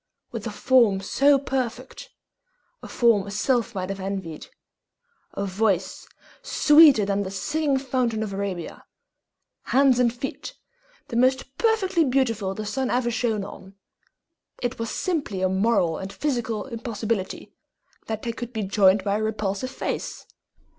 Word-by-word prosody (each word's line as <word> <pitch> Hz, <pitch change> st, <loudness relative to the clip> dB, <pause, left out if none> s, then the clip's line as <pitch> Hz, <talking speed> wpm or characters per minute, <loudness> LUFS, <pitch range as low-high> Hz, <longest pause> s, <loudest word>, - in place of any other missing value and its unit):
With -, -, -5 dB
a -, -, -4 dB
form 235 Hz, -7 st, +3 dB
so 275 Hz, +8 st, +3 dB
perfect 260 Hz, -2 st, -4 dB, 0.7 s
a -, -, -9 dB
form 225 Hz, -5 st, +2 dB
a -, -, -6 dB
sylph 235 Hz, +2 st, 0 dB
might 185 Hz, -1 st, -3 dB
have 195 Hz, 0 st, -4 dB
envied 190 Hz, -5 st, -5 dB, 0.9 s
a 200 Hz, -, -3 dB
voice 190 Hz, -1 st, -1 dB, 0.3 s
sweeter 295 Hz, -8 st, +6 dB
than 200 Hz, 0 st, 0 dB
the 190 Hz, -, -3 dB
Singing 285 Hz, +9 st, 0 dB
Fountain 250 Hz, -4 st, -1 dB
of 205 Hz, -2 st, -5 dB
Arabia, 195 Hz, -4 st, -5 dB, 0.8 s
hands 265 Hz, -2 st, +4 dB
and 240 Hz, -2 st, +3 dB
feet 245 Hz, +3 st, -6 dB, 0.5 s
the 235 Hz, -, -5 dB
most 260 Hz, +2 st, +1 dB
perfectly 390 Hz, -7 st, +2 dB
beautiful 235 Hz, -8 st, 0 dB
the 215 Hz, -, -5 dB
sun 260 Hz, +5 st, -2 dB
ever 245 Hz, -1 st, +1 dB
shone 225 Hz, -3 st, -1 dB
on, 195 Hz, -1 st, -11 dB, 0.8 s
it 245 Hz, 0 st, -3 dB
was 230 Hz, 0 st, -3 dB
simply 285 Hz, -, -2 dB
a -, -, +4 dB
moral 190 Hz, -4 st, +1 dB
and 190 Hz, +1 st, -6 dB
physical 240 Hz, -6 st, -2 dB
impossibility 230 Hz, -5 st, -4 dB, 0.5 s
that 220 Hz, -1 st, -4 dB
they 235 Hz, -, -2 dB
could 240 Hz, +1 st, -7 dB
be 220 Hz, -3 st, -3 dB
joined 195 Hz, 0 st, +4 dB
to 200 Hz, -, -3 dB
a 210 Hz, +2 st, 0 dB
repulsive 215 Hz, +2 st, -2 dB
face. 265 Hz, -, -4 dB
225 Hz, 145 wpm, -24 LUFS, 195-260 Hz, 0.9 s, sweeter